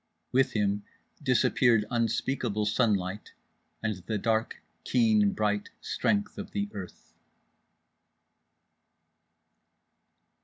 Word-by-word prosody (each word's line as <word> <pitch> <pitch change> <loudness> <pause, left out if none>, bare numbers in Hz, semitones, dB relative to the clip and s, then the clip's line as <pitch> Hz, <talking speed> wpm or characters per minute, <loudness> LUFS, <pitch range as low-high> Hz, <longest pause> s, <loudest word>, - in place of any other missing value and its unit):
With 135 +1 +3
him 105 -1 0 0.4
disappeared 120 -4 +3
unspeakable 115 -2 0
sunlight, 105 -3 0 0.5
and 105 -3 -1
the 110 - 0
dark 110 +1 0 0.2
keen 110 -4 +3
bright 105 -1 0
strength 205 0 -1
of 205 - -7
the 205 0 -1
earth. 95 -3 -9
110 Hz, 80 wpm, -29 LUFS, 105-125 Hz, 0.5 s, With